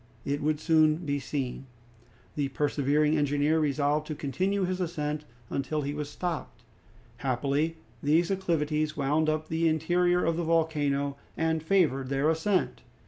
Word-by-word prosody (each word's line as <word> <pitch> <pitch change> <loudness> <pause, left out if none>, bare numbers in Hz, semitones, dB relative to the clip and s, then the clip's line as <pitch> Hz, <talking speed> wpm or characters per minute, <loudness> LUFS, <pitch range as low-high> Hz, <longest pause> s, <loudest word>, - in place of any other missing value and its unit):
It 145 +1 -1
would 150 0 0
soon 155 -1 +4
be 145 -1 0
seen. 135 -1 -4 0.7
The 145 -2 0
persevering 145 +2 +1
engineer 145 +2 +2
resolved 150 0 +1
to 155 - -4
continue 190 +8 -1
his 185 0 -1
ascent 150 -3 -2 0.3
until 145 +2 -1
he 140 +1 -2
was 150 -1 -4
stopped. 175 0 -5 0.5
Happily 140 +5 0 0.2
these 165 +5 +2
acclivities 155 -5 0
wound 150 +2 +2
up 155 0 -1
the 165 +1 +1
interior 175 +3 +2
of 165 0 +1
the 170 - -1
volcano 145 -4 +1 0.2
and 160 0 +1
favored 155 -7 +2
their 140 +2 +1
ascent. 180 +4 0
155 Hz, 140 wpm, -28 LUFS, 145-165 Hz, 0.7 s, soon